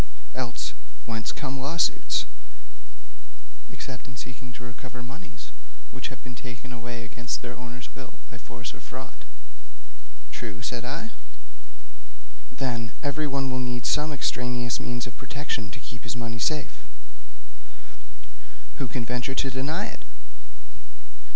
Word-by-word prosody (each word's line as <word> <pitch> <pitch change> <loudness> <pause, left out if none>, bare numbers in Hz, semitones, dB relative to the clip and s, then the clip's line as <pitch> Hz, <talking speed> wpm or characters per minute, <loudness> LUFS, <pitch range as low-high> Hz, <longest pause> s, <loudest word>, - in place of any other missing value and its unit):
Else, 125 -8 +1 0.3
whence 115 -1 +1
come 135 -2 -1
lawsuits, 155 +6 +5 1.5
except 130 0 -4
in 130 - -7
seeking 125 +1 -4
to 125 - -7
recover 125 +1 -5
moneys 150 +7 -7 0.4
which - - -1
have - - -7
been 125 - -4
taken 125 +1 -5
away 120 0 -2
against 120 +1 0
their 120 0 -2
owner's 125 +1 -5
will 135 - -6 0.2
by 120 - -6
force 120 +2 -4
or - - -9
fraud?' - - -6 1.1
'True,' 110 - -3
said 120 -2 +1
I. 165 - -1 1.4
'Then, 120 -3 +1
everyone 140 -2 +3
will 130 - +3
need 125 -1 +1
some 150 +1 +6
extraneous 125 -3 +3
means 120 0 +1
of 120 - -5
protection 130 -5 0
to 110 - -5
keep 120 +1 -6
his 120 - 0
money 115 -1 0
safe.' 150 +3 +3 2.0
'Who 135 - +2
can 115 +1 +1
venture 125 +3 +2
to 135 - +4
deny 135 +5 +3
it?' - - -5
125 Hz, 130 wpm, -31 LUFS, 120-135 Hz, 2.0 s, some